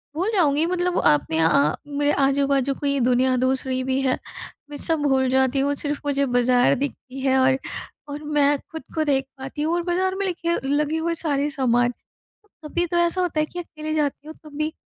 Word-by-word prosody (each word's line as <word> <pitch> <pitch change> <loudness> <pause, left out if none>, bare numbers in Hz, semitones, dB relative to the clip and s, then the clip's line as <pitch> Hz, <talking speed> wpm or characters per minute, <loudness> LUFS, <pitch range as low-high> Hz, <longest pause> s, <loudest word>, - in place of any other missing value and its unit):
भूल 370 +7 0
जाऊँगी 310 -5 +3
मतलब 360 0 0
आपने 150 +2 +3
अ, 155 -2 +3
मेरे 290 0 0
आजू-बाजू 275 -1 +2
कोई 280 0 -1
दुनिया 255 +1 +2
दूसरी 260 0 0
भी 260 +1 0
है। 260 -1 +1 0.5
मैं 295 - -7
सब 325 +1 0
भूल 265 -2 +2
जाती 265 +1 +2
हूँ 280 +1 +1
सिर्फ 290 0 -3
मुझे 280 -1 +1
बाज़ार 245 +1 +3
दिखती 270 -1 -5
है 265 0 +2
और 260 0 +4 0.5
और 290 +1 -6
मैं 290 -1 +2
खुद 320 -1 -7
को 315 - +1
देख 270 -2 +1
पाती 270 +3 -6
हूँ 315 +2 0
और 345 - 0
बाज़ार 375 +2 0
में 395 +1 -2
लिखे 340 -2 -1
लगे 295 +2 +1
हुए 335 +1 -1
सारे 295 -3 -1
सामान। 245 -3 +1 0.7
कभी 345 +3 -1
तो 345 - -2
ऐसा 345 +2 +1
होता 345 -4 0
है 305 - +1
कि 350 - -9
अकेले 310 -2 -5
जाती 295 -1 -1
हूँ, 315 - -8
तब 300 -2 -12
भी 305 +1 -1
285 Hz, 200 wpm, -23 LUFS, 265-315 Hz, 0.7 s, और